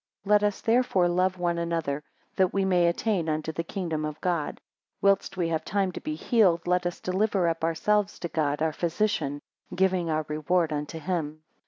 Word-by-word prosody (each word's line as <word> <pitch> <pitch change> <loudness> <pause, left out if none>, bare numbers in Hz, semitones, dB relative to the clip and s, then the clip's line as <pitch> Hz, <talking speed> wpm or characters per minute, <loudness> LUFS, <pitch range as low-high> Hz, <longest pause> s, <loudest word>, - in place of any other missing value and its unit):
3 200 - -10
Let 210 0 +6
us, 205 -1 0
therefore, 225 -6 +3
love 185 +1 +1
one 175 -1 0
another, 165 -4 -2 0.3
that 185 -2 +3
we 195 -1 +1
may 180 -2 +3
attain 170 -1 0
unto 155 +1 -1
the 165 +1 -3
kingdom 165 -4 -3
of 155 0 -4
God. 170 -5 -1 0.4
Whilst 195 -1 +2
we 175 -2 +1
have 160 -1 -1
time 195 -1 0
to - - -7
be 305 0 -3
healed, 195 - +2
let 180 0 +1
us 175 - -5
deliver 190 -1 +1
up 165 -1 -1
ourselves 205 +5 +1
to 170 - -4
God 150 -2 0
our 160 -1 +1
physician, 170 -5 -1 0.3
giving 185 -2 +1
our 155 -1 0
reward 155 +2 0
unto 150 +2 -4
him. 155 -2 -3
175 Hz, 190 wpm, -27 LUFS, 160-190 Hz, 0.4 s, Let